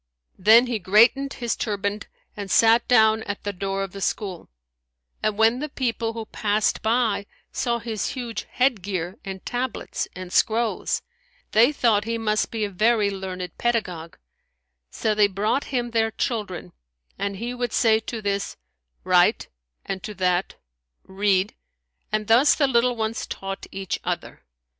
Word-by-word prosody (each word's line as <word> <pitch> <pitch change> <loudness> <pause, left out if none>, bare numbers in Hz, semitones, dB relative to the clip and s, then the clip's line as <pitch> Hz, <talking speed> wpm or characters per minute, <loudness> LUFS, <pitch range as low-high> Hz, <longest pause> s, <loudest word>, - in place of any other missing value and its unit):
Then 220 +6 +7
he 240 -3 -2
greatened 230 +9 +4
his 240 -1 -2
turband[FN#172] 205 -1 -2 0.3
and 200 -2 -6
sat 230 +3 +5
down 220 -2 +5
at 200 -1 -5
the 205 - -3
door 195 +1 -2
of 195 - -6
the 195 - -8
school; 190 -4 -3 0.7
and 215 -1 0
when 225 +3 +4
the 300 +2 -4
people, 230 -4 -2
who 225 -1 -5
passed 210 0 0
by, 220 -3 +1 0.2
saw 240 -2 0
his 225 -3 -3
huge 240 -4 -5
head 250 -5 +1
gear 185 0 -4
and 190 -2 -7
tablets 245 0 -3
and 185 0 -8
scrolls, 230 0 +1 0.5
they 235 +6 +5
thought 225 -7 +2
he 230 0 -1
must 215 -1 0
be 220 -2 -2
a - - -4
very 215 +1 +2
learned 185 -2 -6
pedagogue; 180 -9 -1 0.7
so 215 - -1
they 210 -1 +4
brought 205 +8 0
him 245 -3 -2
their 225 -1 +2
children; 210 - -3 0.5
and 200 0 -2
he 235 +5 -4
would 245 -2 -3
say 220 -2 +4
to 225 0 -6
this, 200 0 -2 0.5
"Write," - - +3 0.4
and 190 -1 -4
to 210 +2 -7
that 180 0 0 0.5
"Read"; 195 +1 +1 0.6
and 215 0 0
thus 240 +7 +5
the 290 - +3
little 245 -1 +2
ones 220 0 -3
taught 195 0 -6
each 195 -1 -4
other. - - -4
215 Hz, 155 wpm, -24 LUFS, 195-235 Hz, 0.7 s, Then